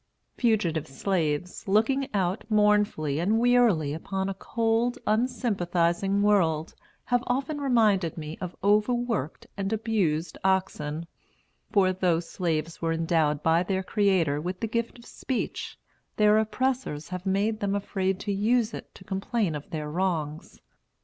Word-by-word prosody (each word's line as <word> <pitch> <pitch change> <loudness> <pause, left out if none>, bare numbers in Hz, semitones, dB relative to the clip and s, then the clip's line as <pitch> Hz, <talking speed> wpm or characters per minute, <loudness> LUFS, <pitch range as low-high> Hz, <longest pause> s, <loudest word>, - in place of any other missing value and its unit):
Fugitive 200 - +1
slaves, 165 +3 -2
looking 225 +7 +2
out 190 -1 0
mournfully 210 -9 +2
and 200 +6 +2
wearily 230 -11 +3
upon 190 +4 -3
a - - -2
cold, 225 +4 0
unsympathizing 200 -5 +1
world, 165 -6 +2 0.3
have 245 0 +1
often 275 +4 -1
reminded 215 - +2
me 155 0 -6
of 180 -1 -5
overworked 210 - +1
and 195 0 -2
abused 200 -8 -1
oxen; 170 -5 0 0.7
for 190 -3 +3
though 180 -3 +1
slaves 165 -2 -3
were 165 -1 0
endowed 160 -3 +1
by 165 +1 +4
their 190 +1 -1
Creator 185 -8 +1
with 180 +3 -4
the - - -1
gift 230 +2 -2
of 240 - -15
speech, 260 - -4 0.4
their 210 0 +5
oppressors 220 - -1
have 180 +1 -5
made 205 +3 +1
them 200 0 0
afraid 190 -2 -1
to 205 - -2
use 225 +3 +1
it - - -9
to - - -13
complain 195 -1 -1
of 150 -1 -7
their 155 -2 -4
wrongs. 160 -1 -2
195 Hz, 135 wpm, -27 LUFS, 165-220 Hz, 0.7 s, their